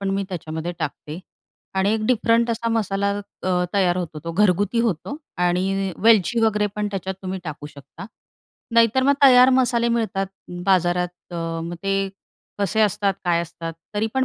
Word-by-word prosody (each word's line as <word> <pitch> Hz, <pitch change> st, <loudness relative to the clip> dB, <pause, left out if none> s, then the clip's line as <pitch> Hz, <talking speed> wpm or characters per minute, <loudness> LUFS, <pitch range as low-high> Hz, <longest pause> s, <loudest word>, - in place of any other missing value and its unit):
पण 195 Hz, -1 st, -1 dB
मी 195 Hz, 0 st, -1 dB
त्याच्यामध्ये 160 Hz, -1 st, -5 dB
टाकते 150 Hz, +2 st, -5 dB, 0.6 s
आणि 190 Hz, +2 st, +2 dB
एक 215 Hz, -1 st, -2 dB
डिफरंट 235 Hz, -1 st, +2 dB
असा 230 Hz, 0 st, -1 dB
मसाला 200 Hz, -3 st, 0 dB, 0.3 s
अ, 180 Hz, -1 st, +1 dB
तयार 185 Hz, -3 st, +2 dB
होतो 170 Hz, -4 st, -4 dB
तो 165 Hz, -, -4 dB
घरगुती 205 Hz, +4 st, +2 dB
होतो 230 Hz, -, -2 dB, 0.3 s
आणि 190 Hz, +2 st, 0 dB
वेलची 225 Hz, +1 st, +4 dB
वगैरे 210 Hz, -1 st, +2 dB
पण 210 Hz, 0 st, -1 dB
त्याच्यात 190 Hz, -1 st, -4 dB
तुम्ही 190 Hz, 0 st, -4 dB
टाकू 150 Hz, -2 st, -6 dB
शकता. 150 Hz, +6 st, -12 dB, 0.7 s
नाहीतर 230 Hz, +2 st, +4 dB
मग 280 Hz, +2 st, +4 dB
तयार 255 Hz, -1 st, +8 dB
मसाले 240 Hz, -2 st, +2 dB
मिळतात 220 Hz, -4 st, 0 dB, 0.4 s
बाजारात. 180 Hz, -2 st, +2 dB, 0.2 s
अ, -, -, -4 dB, 0.3 s
मग 170 Hz, +1 st, -5 dB
ते 195 Hz, 0 st, 0 dB, 0.5 s
कसे 205 Hz, +2 st, 0 dB
असतात, 200 Hz, -1 st, +2 dB
काय 170 Hz, -1 st, +2 dB
असतात? 165 Hz, 0 st, -7 dB, 0.2 s
तरी 210 Hz, +2 st, +1 dB
पण 265 Hz, 0 st, +2 dB
195 Hz, 160 wpm, -22 LUFS, 175-225 Hz, 0.7 s, तयार